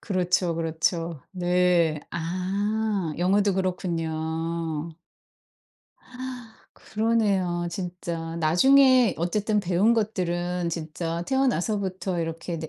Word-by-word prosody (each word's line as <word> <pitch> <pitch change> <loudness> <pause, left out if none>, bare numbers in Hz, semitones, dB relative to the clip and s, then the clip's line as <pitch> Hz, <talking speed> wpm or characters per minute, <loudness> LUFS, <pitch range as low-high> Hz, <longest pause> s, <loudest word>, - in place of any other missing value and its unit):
그렇죠, 180 -3 0
그렇죠. 165 -1 -1
네. 180 -3 +2
아. 190 +2 -1
영어도 195 +2 +2
그렇군요. 165 -3 -2 1.8
그러네요 200 -6 0
진짜. 170 -2 -5
나중에 255 - +5
어쨌든 205 +5 0
배운 190 +4 +3
것들은 180 -5 -1
진짜 165 +1 -4
태어나서부터 200 -8 0
이렇게 165 +1 -4
네 160 0 -6
180 Hz, 210 characters per minute, -25 LUFS, 165-200 Hz, 1.8 s, 나중에